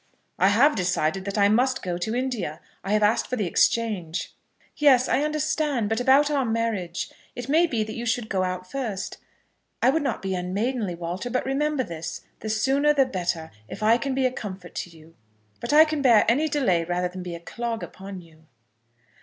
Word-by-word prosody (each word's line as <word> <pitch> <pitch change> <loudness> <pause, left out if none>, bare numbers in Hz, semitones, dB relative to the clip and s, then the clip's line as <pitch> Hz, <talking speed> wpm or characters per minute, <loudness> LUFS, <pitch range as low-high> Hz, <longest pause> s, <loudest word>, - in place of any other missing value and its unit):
"I 190 - +5
have 250 +9 +4
decided 180 0 0
that 200 +1 -3
I 200 -1 +5
must 255 +5 +2
go 175 -1 -3
to 220 +6 -2
India. 245 - -2 0.2
I 195 +2 -1
have 215 0 +3
asked 210 +3 +2
for 255 - -2
the 215 -5 -1
exchange." 185 -3 0 0.4
"Yes; 265 -4 +5
I 275 - +2
understand; 300 -6 0
but 225 - 0
about 275 +4 +4
our 280 -2 +2
marriage. 225 -7 -2 0.2
It 245 - -6
may 325 +5 +4
be 230 -8 0
that 215 0 -6
you 235 +1 -5
should 235 -1 0
go 190 -3 0
out 185 0 -2
first. 220 -6 -4 0.6
I 260 - +4
would 320 +3 +1
not 270 -8 -2
be 190 0 -1
unmaidenly, 195 +3 -2
Walter; 175 +7 -4
but 255 - -1
remember 285 +1 0
this 165 -4 -6 0.2
the 220 - -5
sooner 275 +7 +2
the 270 -2 +5
better, 175 -8 -3 0.2
if 215 - -7
I 225 +3 +5
can 270 +2 -2
be 265 -1 +1
a 255 - +2
comfort 190 -7 -7
to - - -4
you; 165 -1 -17 0.5
but - - -3
I 310 +2 +8
can 310 -2 -2
bear 235 -6 +5
any 280 +8 +3
delay 240 - +2
rather 175 +1 -1
than 185 +1 -8
be 175 -1 -5
a - - -8
clog 230 +6 -4
upon 195 -1 -8
you." 160 -2 -20
220 Hz, 205 wpm, -25 LUFS, 185-265 Hz, 0.6 s, I